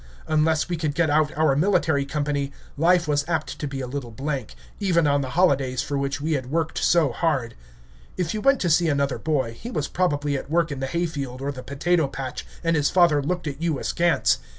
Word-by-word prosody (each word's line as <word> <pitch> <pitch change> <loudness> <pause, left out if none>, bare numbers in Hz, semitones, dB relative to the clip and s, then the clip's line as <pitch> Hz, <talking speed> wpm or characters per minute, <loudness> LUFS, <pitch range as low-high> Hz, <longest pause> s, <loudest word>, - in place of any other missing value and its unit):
Unless 155 0 +2
we 175 -1 -2
could 155 -2 -2
get 160 -2 +2
out 150 0 +3
our 155 -3 +3
military 155 -4 +2
company, 145 -1 -2 0.2
life 170 +2 +3
was 145 -1 +1
apt 155 -5 -2
to 150 - -3
be 135 -1 -5
a - - -3
little 130 -1 -5
blank, 135 0 -4 0.2
even 175 -5 +2
on 145 -1 +2
the 130 - -4
holidays 135 -8 +2
for 145 - -3
which 140 0 -1
we 155 +3 -2
had 130 -4 -2
worked 160 +2 -1
so 165 -6 +3
hard. 130 -4 -1 0.6
If 175 -3 -1
you 215 - -3
went 275 +3 +4
to 175 - +1
see 165 +1 +3
another 140 -2 0
boy, 135 -7 -1
he 230 - -8
was 150 - -2
probably 145 -5 0
at 135 - -5
work 165 0 +1
in 140 - -4
the 135 - -2
hay 170 +6 -1
field 140 -6 -5
or 140 +1 -2
the 130 -2 -8
potato 155 +4 0
patch, 135 -1 -6 0.2
and 165 0 +2
his 145 -2 +2
father 170 -5 +4
looked 175 +4 -2
at 145 0 -5
you 165 -4 0
askance. 170 +5 +2
150 Hz, 220 wpm, -24 LUFS, 140-165 Hz, 0.6 s, went